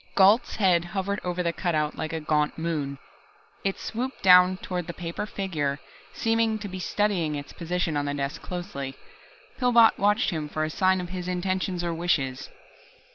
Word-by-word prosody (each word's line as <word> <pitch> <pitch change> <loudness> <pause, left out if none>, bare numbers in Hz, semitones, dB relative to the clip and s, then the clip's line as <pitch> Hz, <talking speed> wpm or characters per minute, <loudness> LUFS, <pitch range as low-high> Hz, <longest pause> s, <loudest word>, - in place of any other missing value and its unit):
Gault's 200 +5 +5
head 185 -5 +3
hovered 195 +2 -2
over 180 0 -1
the 170 -1 0
cutout 155 -5 -1
like 155 - -4
a 160 - -2
gaunt 150 -1 0
moon. 155 -4 -2 0.7
It 195 0 -1
swooped 255 +4 -4
down 180 0 +7
toward 180 -2 -4
the 170 - -6
paper 175 +4 -4
figure, 155 -9 -2 0.3
seemed 225 -1 +1
to 205 - -4
be 185 -1 -6
studying 180 -6 0
its 145 0 -7
position 170 -2 -2
on 145 0 0
the 145 0 -2
desk 140 +2 -3
closely. 175 -7 -5 0.6
Pillbot 235 -3 +5
watched 210 +2 +3
him 155 -3 -3
for 155 +1 -2
a 155 - -2
sign 185 +2 +2
of 175 - -6
his 180 -1 -5
intentions 185 0 -1
or 170 -1 -1
wishes. 150 -6 -1
180 Hz, 175 wpm, -26 LUFS, 155-195 Hz, 0.7 s, down